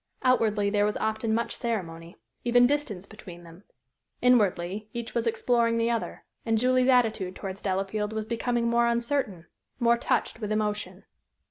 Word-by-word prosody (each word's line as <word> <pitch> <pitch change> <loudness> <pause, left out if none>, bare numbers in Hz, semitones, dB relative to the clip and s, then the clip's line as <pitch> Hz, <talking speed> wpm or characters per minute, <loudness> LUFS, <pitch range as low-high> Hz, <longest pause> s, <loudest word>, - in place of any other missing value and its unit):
Outwardly 215 -5 +2
there 205 -1 +2
was 210 0 0
often 220 +1 -1
much 230 +1 0
ceremony, 170 -7 -4 0.3
even 245 0 +5
distance 245 -9 -1
between 180 -5 -12
them; 170 +3 -15 0.5
inwardly, 210 -4 +2
each 235 -1 -5
was 235 0 0
exploring 230 0 +1
the 230 +1 +1
other, 230 -2 -3 0.2
and 225 -1 +1
Julie's 255 +2 +3
attitude 225 -7 +2
towards 195 -1 -7
Delafield 195 +2 -2
was 220 -1 -3
becoming 235 +1 -1
more 235 0 +3
uncertain, 235 - -1 0.3
more 235 -1 +4
touched 225 - -1
with 215 -2 -4
emotion. 210 -1 -2
220 Hz, 150 wpm, -27 LUFS, 200-235 Hz, 0.5 s, even